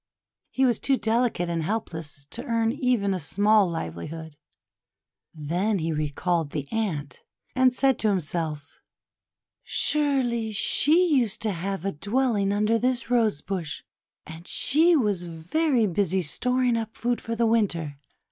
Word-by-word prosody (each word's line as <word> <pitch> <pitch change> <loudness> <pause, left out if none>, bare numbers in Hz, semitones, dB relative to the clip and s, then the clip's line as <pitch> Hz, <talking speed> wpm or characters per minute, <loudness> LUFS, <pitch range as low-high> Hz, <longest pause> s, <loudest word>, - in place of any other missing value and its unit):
He 265 - +1
was 240 -4 +2
too 270 -1 +2
delicate 225 -6 0
and 170 -1 -1
helpless 160 -7 -4
to 240 - -4
earn 230 -3 +1
even 240 -7 0
a 185 - -2
small 205 +5 +3
livelihood. 160 - -6 1.0
Then 175 +8 -1
he 165 -2 -2
recalled 155 +2 -1
the 145 -2 -3
Ant, 155 - -3 0.3
and 255 -1 +4
said 265 0 +2
to 220 - +1
himself: 160 -5 -3 0.4
— - - -66 0.2
"Surely 255 -7 0
she 310 - +4
used 230 -5 0
to 215 - 0
have 195 +1 -4
a 195 - 0
dwelling 205 - 0
under 210 +3 +2
this 250 0 -1
Rose 220 -10 +2
Bush; 180 -5 -4 0.4
and 160 +2 -10
she 325 +5 +3
was 205 - 0
very 230 - 0
busy 190 -1 0
storing 250 - 0
up 225 -1 -5
food 240 0 -1
for 230 - -4
Winter. 170 -11 0
205 Hz, 140 wpm, -25 LUFS, 165-240 Hz, 1.0 s, and